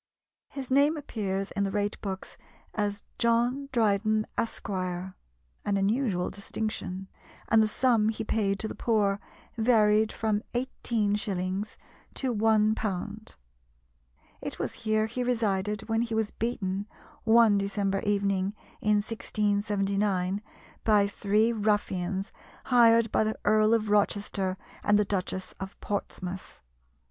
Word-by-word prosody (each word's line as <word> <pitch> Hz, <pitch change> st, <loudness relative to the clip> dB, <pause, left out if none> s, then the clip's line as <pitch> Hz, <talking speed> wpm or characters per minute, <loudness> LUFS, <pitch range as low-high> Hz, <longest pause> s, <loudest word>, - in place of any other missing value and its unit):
His 265 Hz, -2 st, -7 dB
name 285 Hz, +4 st, +4 dB
appears 195 Hz, -8 st, -3 dB
in 200 Hz, -, -1 dB
the 195 Hz, -, 0 dB
rate 205 Hz, +1 st, -2 dB
books 190 Hz, -2 st, -5 dB, 0.4 s
as 205 Hz, -1 st, -2 dB, 0.2 s
"John 240 Hz, +4 st, +2 dB
Dryden, 215 Hz, -2 st, +2 dB
Esq." 230 Hz, -, -3 dB
an 185 Hz, -1 st, -3 dB, 0.5 s
unusual 200 Hz, -1 st, +1 dB
distinction 200 Hz, -2 st, -4 dB, 0.4 s
and 225 Hz, 0 st, +6 dB
the 215 Hz, -, +3 dB
sum 225 Hz, -1 st, +2 dB
he 220 Hz, -, -3 dB
paid 205 Hz, -2 st, 0 dB
to 220 Hz, -, -3 dB
the -, -, -5 dB
poor 205 Hz, -4 st, +1 dB, 0.4 s
varied 220 Hz, -2 st, +4 dB
from 215 Hz, -2 st, 0 dB
18s. 205 Hz, -5 st, -1 dB, 0.4 s
to 260 Hz, -3 st, -1 dB
£1. 215 Hz, -1 st, 0 dB, 1.1 s
It -, -, -5 dB
was -, -, -3 dB
here 215 Hz, 0 st, +1 dB
he 240 Hz, +3 st, -3 dB
resided 210 Hz, -3 st, 0 dB
when 225 Hz, 0 st, +1 dB
he 230 Hz, -1 st, -2 dB
was 220 Hz, -1 st, 0 dB
beaten, 205 Hz, -4 st, -2 dB, 0.4 s
one 225 Hz, -2 st, +5 dB
December 195 Hz, 0 st, 0 dB
evening 200 Hz, -1 st, 0 dB, 0.3 s
in 210 Hz, 0 st, +3 dB
1679, 200 Hz, -3 st, 0 dB, 0.4 s
by 210 Hz, -2 st, +5 dB
three 210 Hz, +3 st, +1 dB
ruffians 200 Hz, -2 st, 0 dB, 0.3 s
hired 230 Hz, -2 st, +5 dB
by -, -, +3 dB
the 215 Hz, 0 st, -1 dB
Earl 215 Hz, +1 st, +5 dB
of 215 Hz, -2 st, -1 dB
Rochester 200 Hz, -2 st, +1 dB, 0.3 s
and 205 Hz, -, +4 dB
the 210 Hz, -, +3 dB
Duchess 190 Hz, -1 st, -3 dB
of 190 Hz, 0 st, -7 dB
Portsmouth. 190 Hz, -2 st, -5 dB
210 Hz, 120 wpm, -28 LUFS, 195-225 Hz, 1.1 s, and